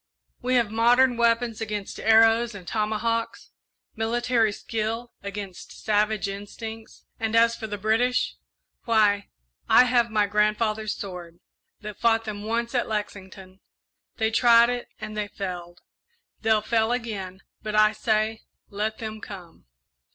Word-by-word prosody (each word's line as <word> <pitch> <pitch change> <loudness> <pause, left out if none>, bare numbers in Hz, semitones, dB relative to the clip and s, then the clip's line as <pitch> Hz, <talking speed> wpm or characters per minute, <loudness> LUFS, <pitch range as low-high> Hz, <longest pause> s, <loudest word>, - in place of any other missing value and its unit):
We 255 +1 0
have 235 -4 +2
modern 240 +3 +4
weapons 230 -1 +1
against 210 -2 -4
arrows 225 +1 +4
and 180 -3 -11
tomahawks, 230 +2 -2 0.4
military 230 0 +1
skill 225 +3 -4
against 200 -2 -8
savage 210 -1 +1
instincts; 220 +3 -8
and 225 0 -1
as 230 0 +5
for 220 - -6
the 205 -1 -4
British, 225 +5 +1 0.5
why, 210 -4 +2 0.4
I - - +8
have 245 -2 +2
my 215 -2 +2
grandfather's 215 +1 0
sword, 175 -3 -8 0.4
that 210 -2 -8
fought 225 -1 +3
them 210 -1 -5
once 230 +3 -2
at 245 - 0
Lexington. 195 -3 -6 0.6
They 220 -1 +1
tried 235 0 +5
it 245 0 -4
and 215 0 -7
they 210 -1 -2
failed 180 -4 -7 0.6
they'll 220 -1 +2
fail 225 0 +1
again; 200 -6 -4 0.2
but 215 0 -4
I 215 0 +5
say, 220 0 0 0.3
let 215 +2 -2
them 220 -1 -6
come!" 180 -6 -11
220 Hz, 135 wpm, -25 LUFS, 205-230 Hz, 0.6 s, I